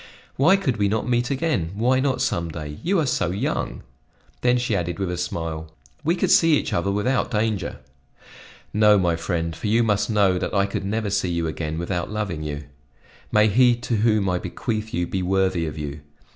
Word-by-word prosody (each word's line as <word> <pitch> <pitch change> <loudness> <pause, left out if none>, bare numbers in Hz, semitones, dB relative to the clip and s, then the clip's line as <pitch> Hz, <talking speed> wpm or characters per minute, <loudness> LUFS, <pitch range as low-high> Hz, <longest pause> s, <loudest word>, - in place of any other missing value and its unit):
"Why 160 +8 +5
could 140 - -1
we 100 -1 +2
not 110 +4 -1
meet 120 0 +1
again? 135 - -1
Why 125 +5 +2
not 135 -1 0
some 85 -1 -1
day 75 -2 -7
you 190 +1 +1
are 155 - +1
so 125 -9 0
young!" 95 +3 -2 0.6
Then 125 0 +3
she 120 -3 0
added 85 -2 -2
with 95 -2 -2
a - - -2
smile: 80 -2 -4 0.3
"We 165 +3 +2
could 175 - 0
see 165 -2 +6
each - - -3
other 85 +3 0
without 115 +6 0
danger." 105 -5 -1 1.0
"No, 105 0 +5
my 90 -3 +2
friend, 85 -1 -2
for - - -4
you 115 +3 +3
must 105 -1 +1
know 100 -4 +3
that - - -3
I 100 0 +3
could 100 -1 -4
never 105 0 -1
see 100 -2 0
you 85 -1 -1
again 80 0 -3
without 85 +1 -2
loving 105 -7 -3
you. 75 -1 -4 0.7
May 105 0 +5
he 120 +3 +5
to 120 -1 -2
whom 105 -2 +2
I 90 -1 +1
bequeath 110 0 -4
you 85 0 -1
be 95 +2 -3
worthy 95 -2 +1
of 75 - -6
you! 75 0 -5
100 Hz, 200 wpm, -23 LUFS, 85-115 Hz, 1.0 s, see